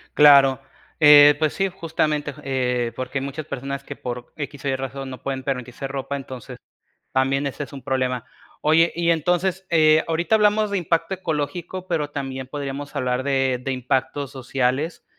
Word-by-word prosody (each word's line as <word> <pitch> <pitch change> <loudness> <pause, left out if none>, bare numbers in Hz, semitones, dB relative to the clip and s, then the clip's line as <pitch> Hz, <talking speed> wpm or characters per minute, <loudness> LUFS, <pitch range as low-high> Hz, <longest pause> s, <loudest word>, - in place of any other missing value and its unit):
Claro. 140 -3 +7 0.4
Eh, 145 -1 +9
pues 155 -2 +1
sí, 195 0 0
justamente, 155 -4 -2
j - - -14
eh, 125 -3 -1
porque 130 +1 -3
hay - - -5
muchas 140 +2 -6
personas 140 +1 -5
que - - -8
por 120 0 -7
X 145 -1 -7
o - - 0
Y 135 - +1
razón 135 0 -5
no 130 - -9
pueden 135 -1 -3
permitirse 125 0 -4
ropa, 140 +1 -4
entonces 130 -3 -9 0.6
también 135 +2 +1
ese 140 +1 -4
es - - -15
un 135 - -8
problema. 125 -1 -1 0.4
Oye, 165 +2 +4
y 170 0 +2
entonces, 180 +3 0
eh, 155 -2 +5
ahorita 170 +6 +2
hablamos 210 0 +3
de 200 - 0
impacto 165 +1 0
ecológico, 175 +1 -4
pero 155 -5 -1
también 135 -2 -5
podríamos 140 +1 -6
hablar 125 +1 -1
de 135 -2 +1
de 135 - -2
impactos 130 +2 -1
sociales, 130 +4 -2
140 Hz, 175 wpm, -23 LUFS, 130-160 Hz, 0.6 s, Eh